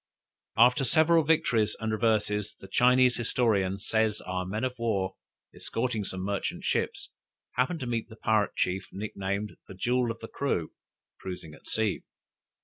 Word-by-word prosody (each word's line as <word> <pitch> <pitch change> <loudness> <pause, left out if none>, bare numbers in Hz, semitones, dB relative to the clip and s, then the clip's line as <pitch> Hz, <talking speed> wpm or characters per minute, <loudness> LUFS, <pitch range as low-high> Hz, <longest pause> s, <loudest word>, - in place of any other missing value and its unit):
After 125 +4 +6
several 160 +6 +4
victories 125 -9 +2
and 110 -1 -2
reverses, 105 -1 +1
the 95 - -11
Chinese 125 +4 +4
historian 110 -5 +1
says 110 +1 0
our 90 0 -3
men 105 +5 -3
of 130 -1 0
war 100 -5 0 0.4
escorting 115 -2 -2
some 95 0 -4
merchant 100 +1 -2
ships, - - -1 0.4
happened 135 +6 0
to - - -2
meet 115 -2 -2
the 110 - -11
pirate 110 -2 +1
chief 95 +1 0
nicknamed 100 0 -4
"The 95 - -10
Jewel 125 +4 +1
of 115 - -3
the 115 - -7
Crew" 100 - -2 0.5
cruising 90 -4 -7
at - - -16
sea. 110 -2 0
110 Hz, 150 wpm, -28 LUFS, 100-125 Hz, 0.5 s, After